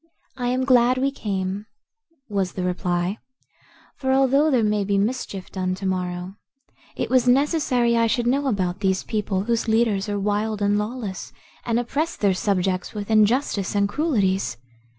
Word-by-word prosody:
"I 250 -2 -3
am 255 +1 0
glad 250 -1 +4
we 270 +2 +1
came," 200 -4 -3 0.6
was 195 -4 -1
the 185 - -3
reply, 180 +2 -1 0.8
"for 265 -1 -1
although 270 +3 +4
there 250 -6 +3
may 210 -1 +1
be 200 0 0
mischief 205 -3 -2
done 185 -1 -2
to 195 +1 -7
morrow, 180 0 -3 0.6
it - - -3
was 255 -1 +3
necessary 255 -3 +2
I 230 0 +3
should 240 +1 0
know 275 +3 +1
about 185 -6 -1
these 190 -2 0
people, 205 -3 -1
whose 235 +1 -1
leaders 220 -3 +1
are 205 - -1
wild 210 +1 -1
and 205 0 +2
lawless 210 -3 -5 0.4
and 235 0 +2
oppress 290 +7 -2
their 200 -2 +2
subjects 185 0 -1
with 205 +1 -4
injustice 215 -2 +2
and 200 0 +3
cruelties. 200 - 0
210 Hz, 160 wpm, -23 LUFS, 195-245 Hz, 0.8 s, glad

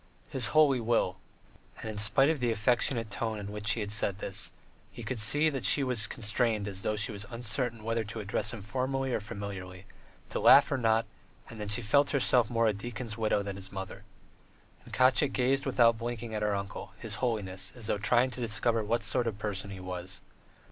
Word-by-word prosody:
His 125 -5 +3
Holy 140 -4 +5
Will!" 110 -5 0 0.6
And - - -7
in 110 -1 -4
spite 135 +8 +4
of 160 - -3
the 120 -2 +1
affectionate 115 0 0
tone 110 0 -2
in 100 0 -6
which 105 0 -6
she 105 0 +2
said 100 -2 +1
this, 100 -2 -2 0.4
he - - -9
could 130 -3 -4
see 140 +5 +3
she 140 - +4
was 120 -4 +2
constrained 110 -2 0
as 95 -1 -3
though 105 - -1
she 105 +2 0
were 100 - -7
uncertain 115 0 -2
whether 115 0 -1
to 105 +2 -6
address 100 -1 -1
him 115 -4 -8
formally 130 +4 -2
or - - +1
familiarly, 100 -3 -7 0.5
to - - -2
laugh - - +7
or 135 - 0
not, 115 -1 +2 0.5
and 110 -2 -8
that 105 - -4
she 115 +3 +1
felt 140 +6 +3
herself 125 -4 +2
more 115 -1 +1
a 110 - +3
deacon's 115 +2 -6
widow 110 -2 0
than 100 -1 -5
his 95 0 -7
mother. 95 -1 -7 0.8
And - - -13
Katya 130 +3 +4
gazed 135 +1 0
without 115 -3 +4
blinking 120 -1 -5
at 105 - -2
her 105 -1 +1
uncle, 100 -1 -6
his - - -5
holiness, 95 -6 -2
as 120 -3 -5
though 105 - 0
trying 120 +4 +2
to 125 - -7
discover 115 0 +1
what 115 +3 0
sort 125 -2 +1
of 110 - -2
a - - -17
person 105 -2 -3
he 95 -1 -8
was. 90 +1 -6
110 Hz, 205 wpm, -30 LUFS, 105-125 Hz, 0.8 s, laugh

